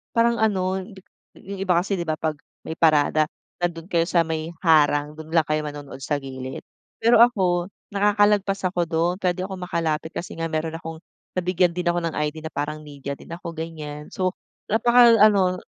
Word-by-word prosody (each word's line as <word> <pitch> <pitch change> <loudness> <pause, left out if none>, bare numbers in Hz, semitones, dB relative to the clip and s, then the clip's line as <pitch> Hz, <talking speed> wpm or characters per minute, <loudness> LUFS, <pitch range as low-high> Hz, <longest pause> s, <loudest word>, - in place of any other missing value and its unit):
parang 235 0 +3
ano, 190 -3 +1
dik 190 -4 -14 0.4
yung 195 0 -7
iba 180 - +4
kasi, 195 +2 -2
'di 170 - -2
ba, 155 - 0
'pag 155 -2 -2 0.3
may - - -4
parada 155 -1 +4 0.3
nandoon 170 -1 -2
kayo 170 -1 +3
sa 170 - +4
may 160 0 -3 0.2
harang, 150 -2 +4
dun 160 0 -10
lang 165 - +5
kayo 155 0 +1
manonood 145 -2 -8
sa 145 +2 -1
gilid. 130 -1 -7 0.4
Pero 230 0 +5
ako 185 -7 +3 0.3
nakakalagpas 205 -1 +2
ako 175 -2 0
dun, 165 +2 +1
puwede 180 0 0
akong 190 -1 -7
makalapit 160 -2 -1
kasi 175 - -5
nga 165 0 -2
meron 160 0 -2
akong 165 -1 -7 0.4
nabigyan 180 -1 +2
din 180 0 -2
ako 175 - 0
ng 165 -1 -2
ID 150 +1 -2
na - - -5
parang 150 +1 -3
media 140 -1 -6
din - - -13
ako, 170 -1 -7
ganiyan. 155 -2 -7
So, 185 -1 0 0.4
napakaano, 215 -5 +5
170 Hz, 180 wpm, -23 LUFS, 155-190 Hz, 0.4 s, lang